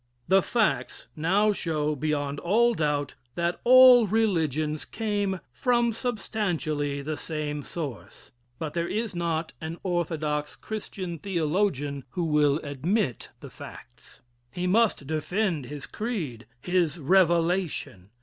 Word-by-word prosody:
The 195 +1 +5
facts 140 - 0
now 195 +7 +2
show 155 -5 -1
beyond 145 0 -2
all 235 +7 +3
doubt 150 - -1 0.2
that 170 0 -1
all 250 -2 +8
religions 160 - 0
came 205 -4 -2
from 235 - +1
substantially 175 - -2
the 155 +2 -3
same 150 -2 -4
source 145 -5 -7 0.3
but 155 +1 -4
there 170 0 -1
is 220 +1 -2
not 170 -2 -2
an 160 +1 -5
orthodox 155 -4 -1
Christian 190 -5 -6
theologian 160 -6 -1
who 175 - -3
will 150 -3 +3
admit 145 - -1
the - - -10
facts. - - -13 0.3
He 180 +8 -4
must 205 -5 +2
defend 160 - -1
his 145 0 -7
creed 160 - -4 0.2
his 175 -3 +1
revelation. 170 - +1
170 Hz, 120 wpm, -27 LUFS, 150-200 Hz, 0.3 s, all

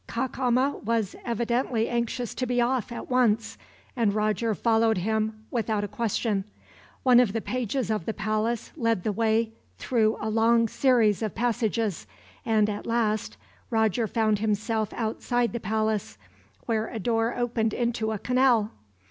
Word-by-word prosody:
Cacama 255 +2 0
was 225 -3 -1
evidently 235 0 0
anxious 240 0 -2
to 255 - -3
be 245 0 0
off 240 -1 0
at 235 - -6
once, 230 -3 +2 0.4
and 220 -5 +1
Roger 215 +1 0
followed 225 0 +2
him 215 +3 -1
without 220 -3 -1
a - - -2
question. 215 -2 -1 0.6
One 250 -2 +6
of 235 -5 +3
the 225 - 0
pages 245 0 -2
of 210 -6 -2
the 225 - -1
palace 215 +2 -1
led 230 - 0
the 215 - 0
way 225 +1 +1 0.3
through 220 -3 +1
a 215 - -3
long 230 +1 +3
series 230 -4 +3
of 215 -2 -3
passages, 225 - -1 0.4
and 215 -2 +2
at 205 -1 -4
last 215 - 0 0.3
Roger 220 0 +1
found 215 -1 +1
himself 220 0 -1
outside 235 +1 -1
the 235 - -2
palace, 215 - -1 0.5
where 225 -1 0
a - - -6
door 225 +2 0
opened 235 -2 0
into 235 -2 -1
a 215 - -2
canal. 250 -2 +2
225 Hz, 150 wpm, -26 LUFS, 215-235 Hz, 0.6 s, One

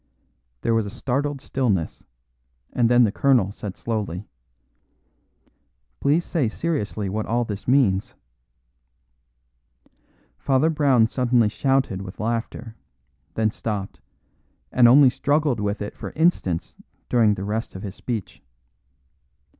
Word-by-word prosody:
There 115 - +1
was 110 -2 +1
a - - -4
startled 140 +5 -2
stillness, 110 - -1 0.7
and 120 -2 +2
then 120 0 +6
the 110 - +2
colonel 120 -6 +2
said 100 -2 -7
slowly, 105 -5 -3 1.7
"Please 150 +5 +2
say 145 -10 0
seriously 110 -9 -2
what 105 +3 -3
all 120 +1 0
this 105 -2 -6
means." 120 -8 +2 2.2
Father 140 +4 +2
Brown 140 -7 +4
suddenly 120 -2 +2
shouted 135 -5 0
with 95 0 -9
laughter, 115 0 -3 0.6
then 110 -1 +1
stopped, 105 -3 -5 0.7
and 125 -1 +6
only 130 +1 +7
struggled 145 -3 +1
with 105 0 -2
it 105 - -7
for - - -7
instants 150 - 0 0.3
during 110 -4 +3
the 95 - -5
rest 110 +1 -3
of 95 - -7
his 100 -3 -5
speech. 105 - -5
115 Hz, 120 wpm, -23 LUFS, 105-135 Hz, 2.2 s, only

